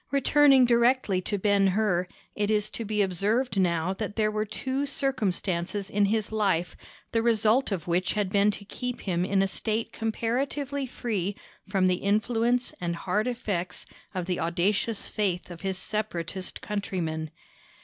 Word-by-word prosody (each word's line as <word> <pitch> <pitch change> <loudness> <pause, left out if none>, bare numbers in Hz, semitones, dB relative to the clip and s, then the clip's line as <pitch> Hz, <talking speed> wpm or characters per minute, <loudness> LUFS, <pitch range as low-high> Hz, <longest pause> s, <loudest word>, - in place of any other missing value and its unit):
Returning 275 -1 +5
directly 235 -5 +3
to 205 +2 -2
Ben 200 0 +3
Hur, 185 -5 +2 0.3
it 205 0 0
is 215 -1 +1
to 230 - -4
be 210 -1 +1
observed 200 +5 0
now 170 0 +1
that 205 +1 -4
there 215 -1 +2
were 215 0 -1
two 265 +6 -2
circumstances 200 -8 -1
in 205 0 +3
his 215 +1 0
life 195 -6 +1 0.4
the 225 - +2
result 225 +2 +3
of 180 -5 -3
which 180 +2 +1
had 205 -3 -1
been 200 +1 +4
to 205 0 -4
keep 250 +4 -5
him 175 -3 0
in 195 +1 +2
a - - +2
state 220 +3 -2
comparatively 265 +5 -1
free 205 -6 -2 0.3
from 190 -2 +2
the 185 -1 +3
influence 230 +5 +1
and 170 -1 -1
hard 205 +6 0
effects 205 -8 -3 0.3
of 180 -2 -1
the 180 -1 -1
audacious 190 +6 0
faith 185 -4 -1
of 170 - -9
his 190 -1 -2
Separatist 190 -3 -4
countrymen. 170 -7 -3
205 Hz, 160 wpm, -27 LUFS, 185-230 Hz, 0.4 s, Returning